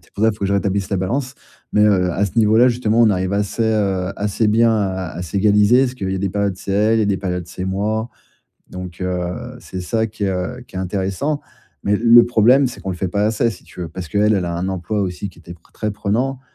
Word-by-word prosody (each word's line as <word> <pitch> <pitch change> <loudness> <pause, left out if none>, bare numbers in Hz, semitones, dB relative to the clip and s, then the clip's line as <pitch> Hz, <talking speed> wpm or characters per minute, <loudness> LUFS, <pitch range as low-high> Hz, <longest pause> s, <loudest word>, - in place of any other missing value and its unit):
c'est - - -28
pour 105 - -3
ça 110 - +5
il - - -6
faut - - -24
que 100 - 0
je 100 - 0
rétablisse 100 0 -1
la 100 - +1
balance, 125 +8 -2 0.4
mais, 105 - +4
heu, 95 -4 +3
à 100 - +1
ce 100 - -11
niveau 110 0 +4
là 125 - +7
justement, 115 -2 +1
on 115 -2 +6
arrive 95 0 -1
assez, 105 +3 -1
heu, 100 -4 0
assez 105 +2 0
bien 115 +2 +4
à 95 -3 -1
à 90 - -5
s'égaliser 105 +7 +3
parce 125 -1 -1
qu'il 95 -6 -4
y - - -1
a - - -3
des 100 0 -1
périodes 100 -2 -1
c'est 100 - -5
elle, 105 +3 +3
il - - +2
y - - +3
a - - +1
des 100 - +1
périodes 90 -2 -3
c'est 90 +2 -6
moi. 105 +4 -1 0.6
Donc, 90 0 -8
heu, 90 -1 -3
c'est 95 - -7
ça 110 +4 -1
qui 105 -1 -6
est, 95 - +1
heu, 95 +8 -3
qui - - -16
est 95 - -2
intéressant, 100 - -2 0.4
mais 105 +1 +2
le 120 +1 +7
problème, 120 +4 +4
c'est 125 - -9
qu'on 95 - -5
le 90 - -4
fait 95 - -1
pas 100 +2 0
assez 115 +1 +1
si - - -13
tu 90 - -10
veux, 85 - -4
parce 90 0 -7
qu'elle, 105 +1 +2
elle 95 -3 0
a 85 0 -3
un 90 +2 -2
emploi 95 +3 -2
aussi 95 +1 -3
qui 85 - -21
était 85 0 -10
p 85 - -18
très 110 -1 -3
prenant, 120 +6 -1
100 Hz, 270 wpm, -19 LUFS, 95-110 Hz, 0.6 s, là